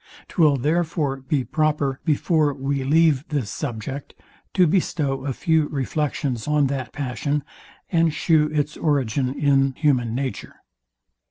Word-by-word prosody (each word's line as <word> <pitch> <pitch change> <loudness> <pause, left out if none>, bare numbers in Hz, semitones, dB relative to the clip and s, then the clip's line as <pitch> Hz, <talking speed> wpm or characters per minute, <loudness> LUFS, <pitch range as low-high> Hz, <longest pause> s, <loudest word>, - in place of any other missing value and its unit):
Twill 155 -5 +3
therefore 155 0 0
be 135 +1 -1
proper, 150 -2 0
before 155 -2 +2
we 135 0 -2
leave 150 -1 +3
this 140 -9 -2
subject, 135 +1 -5 0.4
to 185 - +5
bestow 150 -6 0
a - - 0
few 160 +3 +1
reflections 140 -3 -2
on 150 -1 +3
that 130 -2 -4
passion, 140 +1 -2 0.5
and 165 -2 +3
shew 155 0 +2
its 150 -1 -1
origin 135 -4 0
in 135 -2 +3
human 125 -6 +1
nature. 130 -5 -4
145 Hz, 125 wpm, -23 LUFS, 135-155 Hz, 0.5 s, to